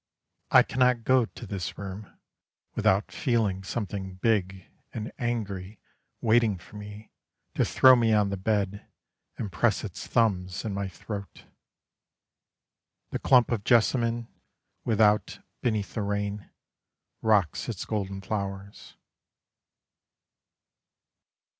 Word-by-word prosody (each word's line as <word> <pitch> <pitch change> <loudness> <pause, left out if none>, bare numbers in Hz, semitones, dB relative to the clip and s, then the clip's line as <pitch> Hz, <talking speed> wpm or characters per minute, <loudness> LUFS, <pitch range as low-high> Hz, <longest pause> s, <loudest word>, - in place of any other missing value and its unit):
I - - +7
cannot 125 -2 +2
go 130 0 +4
to - - -11
this 95 -5 -5
room, 100 +1 -8 0.6
Without 95 +2 +2
feeling 110 -8 0
something 95 -2 -4
big 95 -2 0 0.3
and 110 0 -5
angry 105 -5 -3 0.4
Waiting 110 -3 +3
for 85 +4 -16
me 105 +1 -10 0.4
To - - +2
throw 130 -1 +7
me 115 -2 +2
on 105 -2 +3
the - - -1
bed, 100 0 -1 0.5
And 100 - -4
press 105 +5 +1
its 100 -6 -7
thumbs 95 -5 +1
in 105 - -2
my 100 0 -2
throat. 100 +2 -8 1.7
The - - -2
clump 125 -2 +4
of 110 -4 -1
jessamine 115 0 +2 0.6
Without, 105 -2 +3 0.2
beneath 110 -4 -1
the 110 - -2
rain, 100 0 -3 0.7
Rocks 105 -8 +2
its - - -4
golden 100 -2 -3
flowers. 100 0 -5
105 Hz, 110 wpm, -27 LUFS, 95-115 Hz, 1.7 s, I